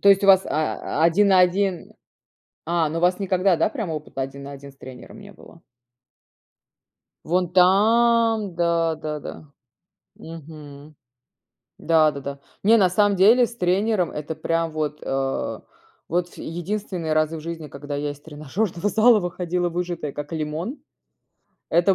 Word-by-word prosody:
То 200 - +4
есть 195 0 +6
у - - +2
вас, 190 -1 +7
а, 155 0 -2
один 190 +5 +4
на 190 -2 +5
один? 180 0 0 0.7
А, 165 -1 0
ну 165 +2 -3
у - - -7
вас 180 +2 +2
никогда, 190 -1 +2
да, - - +2
прямо 220 - -4
опыта 150 -3 -6
один 135 +1 -6
на 140 - -8
один 140 0 -11
с 135 - -28
тренером 130 - -12
не 200 0 -13
было? 165 -1 -17 1.6
Вон 180 +1 0
там, 220 +2 +3
да, 170 -1 +1
да-да. 150 -1 -7 0.6
Мгм. 155 -2 -12 0.8
Да-да-да. 150 -4 +1 0.2
Не, 225 +3 +6
на 190 -4 +4
самом 205 +2 +2
деле 225 +7 +5
с 235 - -10
тренером- 190 -1 0
это 150 +1 -5
прям 165 +1 -1
вот, 150 -1 -3
э, 135 0 -2 0.5
вот 175 +1 0
ф - - -18
единственные 175 -1 -4
разы 155 +1 0
в - - -8
жизни, 165 -1 -6
когда 145 +1 -7
я 145 0 -2
из 145 - -12
тренажерного 165 +6 -3
зала 220 +3 +5
выходила 175 -1 -2
выжатая 170 -3 -4
как 145 +3 -7
лимон. 160 - -4 0.9
Это 175 +3 +3
170 Hz, 150 wpm, -23 LUFS, 155-195 Hz, 1.6 s, вас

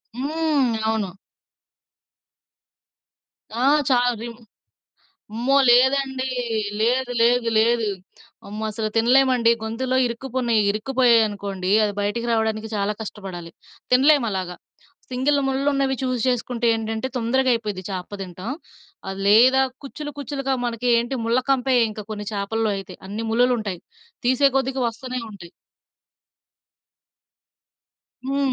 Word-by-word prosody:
హ్మ్. 290 -2 0 0.2
అవును. 220 -3 -1 2.5
ఆ! 245 +2 0 0.2
చా 255 - +4 0.2
విన్ 235 -1 -7 1.0
అమ్మో! 250 +5 +2
లేదండీ. 265 +1 +3 0.5
లేదు 245 +3 +1
లేదు 240 0 +3
లేదు. 230 0 +2 0.6
అమ్మో! 210 +2 -6
అసలు 215 0 -3
తినలేమండి 250 0 +4
గొంతులో 255 +4 -1
ఇరుక్కుపునయి, 240 -2 -1
ఇరుక్కుపోయాయి 235 +1 +3
అనుకోండి 195 -2 -4
అది 205 -1 0
బయటికి 210 +4 -2
రావడానికి 220 -1 -1
చాలా 205 +1 0
కష్టపడాలి. 190 -5 -8 0.4
తినలేము 270 0 +5
అలాగా. 185 -2 -4 0.6
సింగిల్ 265 +3 +1
ముళ్ళులు 270 +1 0
ఉన్నవి 270 -1 0
చూస్ 255 -2 -1
చేసుకుంటే 245 -1 -1
ఏంటంటే 225 +2 -3
తొందరగా 255 +2 +1
అయిపోద్ది 210 -5 -4
చాప 185 -2 -5
తినటం. 185 +3 -6 0.6
అది 195 0 -5
లేదా, 250 +6 +6 0.2
కుచ్చులు 295 +2 -7
కుచ్చులుగా 275 -1 -2
మనకి 240 0 -2
ఏంటి 240 +3 -2
ముళ్ళ 235 +2 +2
కంపే 265 -1 +2 0.2
ఇంక 215 -1 -8
కొన్ని 210 -1 -5
చేపల్లో 215 +2 -1
అయితే. 195 - -9
అన్ని 215 +3 -4
ముళ్లు‌లు 245 +2 +3
ఉంటయి. 200 -5 -5 0.5
తీసే 260 +3 +4
కొద్దికి 265 0 -2
వస్తునే 255 +2 -6
ఉంటయి. 185 -5 -12 2.8
హుహు. 275 +1 -1
235 Hz, 115 wpm, -22 LUFS, 215-260 Hz, 2.8 s, లేదా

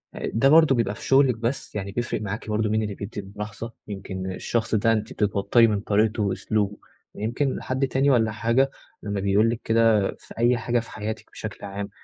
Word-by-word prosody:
أ - - -4
ده 135 +5 +4
برضو 155 -3 +6
بيبقى 115 -1 0
في - - -11
شغلِك 135 -3 +4
بس، 115 0 -3
يعني 100 -1 -3
بيفرق 120 0 -2
معاكِ 105 +1 -5
برضو 105 0 0
مين 110 0 +1
اللي 105 -2 -4
بيدي 100 0 -6
الملاحظة؟ 105 +3 -7
يمكن 95 -2 -5
الشخص 110 +4 -1
ده 115 +2 +3
أنتِ 110 -1 -2
بتتوتري 105 +3 +3
من 105 -2 0
طريقته 105 +1 +1
وأسلوبه، 105 +1 -1 0.4
يمكن 120 +6 -1
حد 130 +1 -1
تاني 135 +2 +2
والّا 115 -5 +3
حاجة 115 +5 +1 0.3
لمّا 100 -1 -2
بيقول 100 +3 +3
لِك 115 0 -2
كده 115 -3 +3
في - - -13
أي 120 +1 +3
حاجة 120 +1 0
في 115 - -9
حياتِك 110 +1 -6
بشكل - - -7
عام، 100 0 -5
110 Hz, 195 wpm, -24 LUFS, 105-120 Hz, 0.4 s, برضو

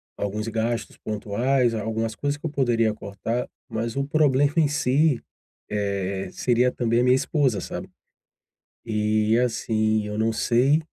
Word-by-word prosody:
alguns 105 +2 -3
gastos 115 +1 -2
pontuais, 115 +4 0
algumas 110 0 -2
coisas 145 +3 -2
que 145 - -10
eu - - 0
poderia 120 -6 +2
cortar, 105 +3 -4 0.2
mas 115 +1 -3
o 140 - 0
problema 145 -1 +3
em 160 -2 +5
si, 145 -1 +2 0.5
eh, 100 -2 -2
seria 125 0 +2
também 120 -1 +1
a - - +2
minha 125 0 +5
esposa, 130 -4 +1
sabe, - - -6 1.0
eh, 110 0 +2
assim, 110 -2 0
eu 105 0 -4
não 110 +1 +2
sei 125 +6 +3
115 Hz, 145 wpm, -24 LUFS, 110-130 Hz, 1.0 s, em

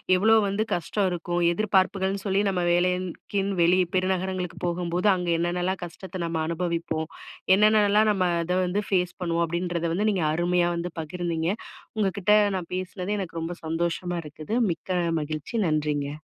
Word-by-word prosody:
எவ்ளோ 215 +5 +4
வந்து 200 +2 0
கஷ்டம் 195 +3 0
இருக்கும்? 175 0 -2
எதிர்பார்ப்புகள்னு 195 0 +1
சொல்லி 195 0 +2
நம்ம 185 -2 0
வேலைக்குன்னு, 185 +2 0
வெளிய 180 +2 +4
பெருநகரங்களுக்கு 185 -1 -1
போகும்போது 175 +2 0
அங்க 180 -1 -3
என்னென்னலாம் 180 +2 -1
கஷ்டத்த 185 +2 -8
நம்ம 165 -1 -2
அனுபவிப்போம்? 165 -2 -2 0.5
என்னென்னலாம் 210 +1 +4
நம்ம 190 -3 +1 0.2
அத 180 +2 0
வந்து 185 +3 0
ஃபேஸ் 180 -2 0
பண்ணுவோம்? 170 -1 +1
அப்டின்றத 170 0 -2
வந்து 205 +5 +1
நீங்க 185 -5 0
அருமையா 175 +1 +2
வந்து 170 +1 -3
பகிர்ந்தீங்க. 165 0 -2 0.5
உங்க 210 -2 +2
கிட்ட 200 +2 +2 0.3
நான் 175 -2 -7
பேசுனது 185 +2 -3
எனக்கு 170 -3 -4
ரொம்ப 165 +2 -4
சந்தோஷமா 170 +2 -1
இருக்குது, 155 +6 -7 0.2
மிக்க 165 +3 -7 0.3
மகிழ்ச்சி. 150 0 -4 0.2
நன்றிங்க. 150 -2 -1
180 Hz, 145 wpm, -26 LUFS, 170-190 Hz, 0.5 s, எவ்ளோ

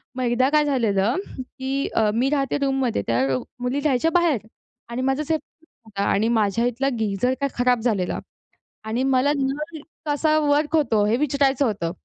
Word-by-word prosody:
मग 255 - -2
एकदा 245 +2 +2
काय 300 0 +3
झालेलं, 230 -5 +1 0.2
की 265 +2 -3
अ, 220 -2 +3
मी 255 +4 +2
राहते 275 -3 0
रूममध्ये 270 - 0
त्या 115 +1 +1 0.4
मुली 250 +3 -1
राहायच्या 295 +2 +1
बाहेर. 310 - +1 0.4
आणि 235 +2 -3
माझाच 270 +4 -1
हे - - +4 0.5
होता 200 -2 -4
आणि 215 +3 +2
माझ्या 225 0 +1
इथला 245 +3 0
गीझर 220 +4 0
काय 280 - +1
खराब 245 -1 +3
झालेला. 205 -7 0 0.6
आणि 225 +4 -2
मला 270 +1 +2
नळ 300 +4 -3 0.3
कसा 305 +1 +2
वर्क 295 +1 +1
होतो 230 -9 +2
हे 215 - +2
विचारायचं 280 -1 +2
होतं. 190 -8 -1
260 Hz, 165 wpm, -23 LUFS, 225-285 Hz, 0.6 s, हे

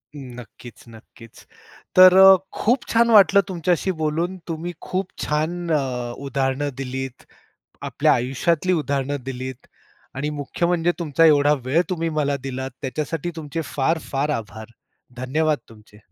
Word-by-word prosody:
नक्कीच-नक्कीच. 120 -3 -13 0.5
तर 185 0 +8
अ, 190 0 +9 0.2
खूप 240 +3 +1
छान 235 +1 +3
वाटलं 200 -1 +6
तुमच्याशी 180 0 0
बोलून. 165 +5 -1
तुम्ही 170 +2 -5
खूप 185 0 -3 0.2
छान 165 +4 -2
अ, 125 -5 -1
उदाहरणं 135 +1 -1
दिलीत 130 -1 -6 0.6
आपल्या - - +2
आयुष्यातली 150 +8 0
उदाहरणं 140 -3 -1
दिलीत 130 -1 -7 0.5
आणि 140 +3 -2
मुख्य 150 +3 -3
म्हणजे 175 0 +1
तुमचा 165 0 +2
एवढा 145 -1 +5
वेळ 145 +7 +2
तुम्ही 165 -2 -1
मला 145 -1 0
दिलात, 130 0 -4
त्याच्यासाठी 150 +5 -3
तुमचे 160 +1 -5
फार-फार 145 0 -1
आभार. 110 +1 -9 0.5
धन्यवाद 150 +5 0
तुमचे. 105 -1 -19
145 Hz, 125 wpm, -22 LUFS, 130-170 Hz, 0.6 s, अ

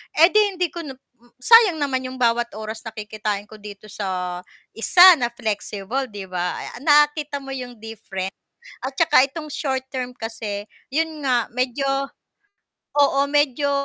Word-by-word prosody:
eh 330 +3 +7
di 420 -2 +3
hindi 355 -3 -1
ko 345 - -7
na 290 -5 -7
hmm, 245 -2 -30
sayang 455 -6 +7
naman 265 -4 -2
'yong 255 - -8
bawat 240 -1 +1
oras 220 +1 -6
na 220 - -8
kikitain 210 -1 -4
ko 215 +1 -14
dito 210 0 -11
sa 180 -3 -3 0.3
isa 350 +11 +4 0.2
na 240 - +1
flexible 220 +1 -3
'di 205 -4 -8
ba, 180 -1 -3
ah, - - -8
nakita 295 0 +2
mo 270 - -8
'yong 250 -2 -6
difference. 195 -4 -6 0.5
At 265 - -3
saka 325 -5 +5
itong 305 +3 -6
short-term 260 -3 -3
kasi, 220 -3 -6 0.2
'yon 315 0 -2
nga 245 -3 +1
medyo 255 +3 -2 1.1
oo, 280 -1 +4
medyo 290 -1 +2
250 Hz, 155 wpm, -22 LUFS, 215-290 Hz, 1.1 s, eh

